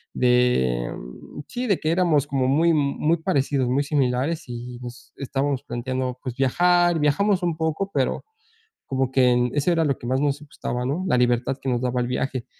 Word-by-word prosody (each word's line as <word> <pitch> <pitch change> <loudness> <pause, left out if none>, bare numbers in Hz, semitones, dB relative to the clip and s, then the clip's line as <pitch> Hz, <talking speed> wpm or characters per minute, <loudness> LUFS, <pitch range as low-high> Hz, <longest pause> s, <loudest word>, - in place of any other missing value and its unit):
de, 125 - +2
mm, 60 - -10
sí, 250 +1 -4
de 200 -5 +2
que 155 - 0
éramos 165 -5 +2
como 135 -3 0
muy 160 +6 +3
muy 150 +2 +1
parecidos, 140 -6 0
muy 135 +3 +1
similares 140 +2 0
y 120 0 -7
nos 125 0 -10
estábamos 140 0 -2
planteando, 125 +1 -3
pues, 125 -3 -5
viajar. 175 +5 +3
Viajamos 185 +6 +2
un 170 -2 -1
poco, 160 +5 -2
pero 135 -3 0 0.6
como 130 -1 -1
que 125 -2 +3
eso 145 +4 +1
era 165 -1 +2
lo 140 -4 +1
que 120 - -8
más 130 +1 +1
nos 145 0 0
gustaba, 125 -4 -5
¿no?, 155 +8 -2
la 125 - +2
libertad 125 +1 +1
que 135 - -4
nos 120 -1 +1
daba 125 0 0
el 120 - -1
viaje. 130 0 -2
135 Hz, 185 wpm, -23 LUFS, 125-155 Hz, 0.6 s, muy